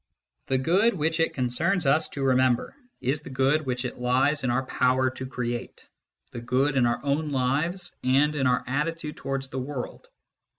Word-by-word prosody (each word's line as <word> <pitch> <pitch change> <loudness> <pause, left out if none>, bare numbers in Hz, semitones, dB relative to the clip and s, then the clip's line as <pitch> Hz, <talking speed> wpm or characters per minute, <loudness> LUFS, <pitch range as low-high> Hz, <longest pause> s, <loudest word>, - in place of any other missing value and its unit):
The 135 - +1
good 190 - +3
which 160 0 0
it 165 - +1
concerns 155 +8 0
us 155 +4 +3
to 140 - -4
remember 130 - +2 0.3
is 135 +4 0
the - - -10
good 135 +3 +1
which 125 0 -2
it 125 - -5
lies 130 +4 +2
in 130 - +1
our 130 +2 0
power 130 0 +2
to 130 0 -7
create 120 -2 -5 0.4
the 120 - -6
good 130 +4 +1
in 125 -3 +4
our 120 - 0
own 145 +2 0
lives 150 +7 -1
and 140 +4 +3
in 135 -3 +1
our 125 0 +2
attitude 150 +3 -2
towards 135 -1 -3
the 130 - -4
world. 130 -1 -6
135 Hz, 180 wpm, -26 LUFS, 125-150 Hz, 0.4 s, in